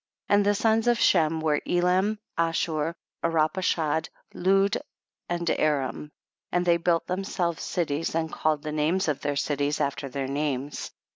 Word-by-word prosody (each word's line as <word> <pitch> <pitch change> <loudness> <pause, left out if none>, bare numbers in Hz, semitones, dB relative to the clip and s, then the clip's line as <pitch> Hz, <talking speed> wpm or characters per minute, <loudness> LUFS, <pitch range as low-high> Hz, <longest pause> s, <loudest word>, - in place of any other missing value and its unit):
31. - - +5
And 205 - +2
the 205 - +4
sons 225 +2 +2
of 240 -1 +3
Shem 160 0 +3
were 150 -2 +1
Elam, 185 +4 +2 0.2
Ashur, 165 -1 0 0.3
Arpachshad, 160 -1 +1 0.2
Lud 195 +2 +2 0.5
and 175 0 -2
Aram, 150 0 0 0.4
and 180 0 +1
they 170 -1 +4
built 170 0 +1
themselves 180 -2 -2
cities 160 -2 -2
and 160 -1 -1
called 155 -2 0
the 155 - -3
names 155 +5 +1
of 150 -3 +1
all - - -31
their 145 - -1
cities 145 +1 0
after 140 0 -2
their 135 +1 -3
names. 140 0 -2
165 Hz, 155 wpm, -26 LUFS, 150-180 Hz, 0.5 s, 31